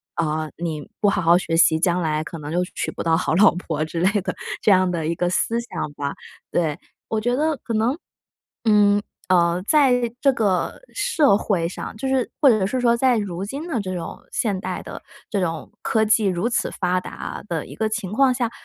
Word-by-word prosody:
呃， 155 -1 -1
“你 160 -3 -4
不 205 - +2
好 195 - +2
好 170 +1 +5
学 165 -2 -1
习， 160 -1 +5
将 180 0 +1
来 155 -1 0
可 165 0 -8
能 150 +1 -6
就 180 +1 +1
娶 - - -2
不 - - -5
到 165 -1 +3
好 165 - 0
老 195 0 +6
婆” 160 -4 -2
之 165 +2 -4
类 200 +4 +2
的 - - -3 0.3
这 210 - +5
样 185 -1 +4
的 170 -3 -2
一 165 - 0
个 175 +1 0
思 230 +5 0
想 235 -10 -5
吧， 140 -1 -4 0.4
对。 160 -4 0 0.3
我 220 -1 0
觉 245 +2 +1
得 315 +1 +1
可 230 - -4
能， 230 +6 +2 0.7
嗯， 205 -1 +5 0.3
呃， 175 -1 +3
在 265 -4 +4 0.2
这 275 0 +4
个 205 - 0
社 320 - +3
会 185 -6 0
上 190 - -7
就 225 - -6
是 265 -2 +1
或 285 - +7
者 215 -5 +3
是 255 +3 -1
说， 235 -1 +3
在 250 -1 +3
如 195 -2 -3
今 280 +9 -5
的 260 -9 -1
这 185 -2 -4
种 170 - -6
现 200 -5 0
代 185 -1 -4
的 - - -8 0.3
这 205 - -1
种 165 -4 -3
科 220 -1 +1
技 215 0 +3
如 190 +4 0
此 240 - 0
发 180 0 0
达 - - -7
的 165 -5 -3
一 - - -10
个 220 - -1
情 200 -3 -3
况 265 +3 +4
下， 240 -2 -1
190 Hz, 230 characters per minute, -22 LUFS, 170-235 Hz, 0.7 s, 或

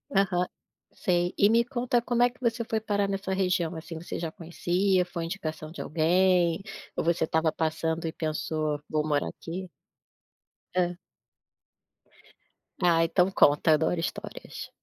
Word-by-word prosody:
Aham, 185 -2 +2 0.4
sei. 175 0 0
E 200 - +5
me 230 +1 +5
conta 245 -1 0
como 240 0 +2
é 245 - +4
que 250 - -25
você 235 -1 0
foi 220 - 0
parar 205 -2 0
nessa 195 0 -3
região 180 -3 +1
assim 165 +1 -7
você 175 - -5
já 165 -2 -3
conhecia, 180 +3 +1
foi 175 -1 -5
indicação 160 -4 -5
de 170 - -7
alguém, 175 +2 +2 0.3
ou - - -1
você 165 -1 +2
estava 160 0 +1
passando 160 +1 -1
e - - -2
pensou: 155 -1 -2
"Vou 155 0 0
morar 145 -2 +1
aqui"? 180 +2 -7 1.1
Hã. 175 -1 +1 1.9
Ah, 165 -2 +5
então 180 +3 +2
conta, 150 -3 +4
adoro 160 +3 +2
histórias. - - -6
175 Hz, 145 wpm, -28 LUFS, 160-195 Hz, 1.9 s, E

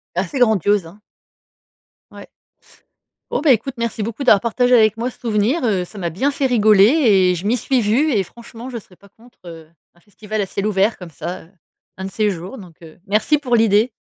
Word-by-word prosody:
Assez 185 +8 -3
grandiose, 205 -5 +2
hein. 175 +6 -14 1.1
Ouais. - - -12 1.0
Oh - - -1
bah, 300 -2 +4
écoute, 250 +3 0
merci 230 -2 -3
beaucoup 230 +6 -5
d'avoir 210 -7 +5
partagé 245 +2 +2
avec 220 -2 +3
moi 235 +2 -2
ce - - -17
souvenir, 230 +6 0
heu, 195 -6 0
ça 205 - -14
m'a 175 -3 -3
bien 195 - -1
fait 280 -1 -2
rigoler 215 -5 +4
et 210 - +3
je 175 +3 -7
m'y 240 +4 +1
suis 255 +2 0
vue 245 +9 +1
et 205 -5 +1
franchement, 235 +4 -12
je 245 - -6
serais 195 -4 -14
pas 200 +2 -21
contre, 235 +5 -23
heu, 165 -2 -11 0.3
un 175 - -25
festival 210 +2 -6
à - - -1
ciel 200 +2 -3
ouvert 205 +1 +1
comme 180 -2 -10
ça, 175 +3 -7
heu, 165 - -23 0.5
un 190 - -6
de 195 - -6
ces 215 -1 0
jours, 185 +6 -7
donc, 180 -6 -13
heu, 160 -1 -14
merci 215 +9 +2
pour 250 -4 0
l'idée. 225 +1 +3
215 Hz, 215 wpm, -19 LUFS, 190-240 Hz, 1.1 s, d'avoir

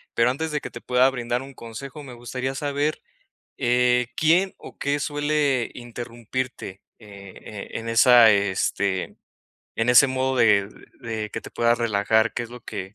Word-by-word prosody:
pero 115 +2 +3
antes 160 +4 -3
de 150 -1 -2
que - - -8
te 120 - -9
pueda 125 +1 +3
brindar 120 0 -2
un 135 0 -11
consejo, 125 +6 -9
me 130 -3 -10
gustaría 130 +2 -5
saber, 145 +2 -1 0.6
eh, 125 0 +2
¿quién 175 +5 +2
o - - -13
qué 145 +1 -1
suele 145 -4 0
interrumpirte? 120 -3 -6 0.3
Eh, 100 0 -10
en 115 - -7
esa, 115 0 +7
este, 100 -1 0 0.6
en 115 +2 +2
ese 125 +3 +7
modo 130 0 -1
de 100 -3 +4 0.3
de 110 -3 -4
que 115 - -6
te - - -10
puedas 120 0 +2
relajar, 110 0 +1
¿que 120 - -3
es 115 - -8
lo 125 0 -10
que 95 +3 -7
120 Hz, 160 wpm, -24 LUFS, 115-135 Hz, 0.6 s, esa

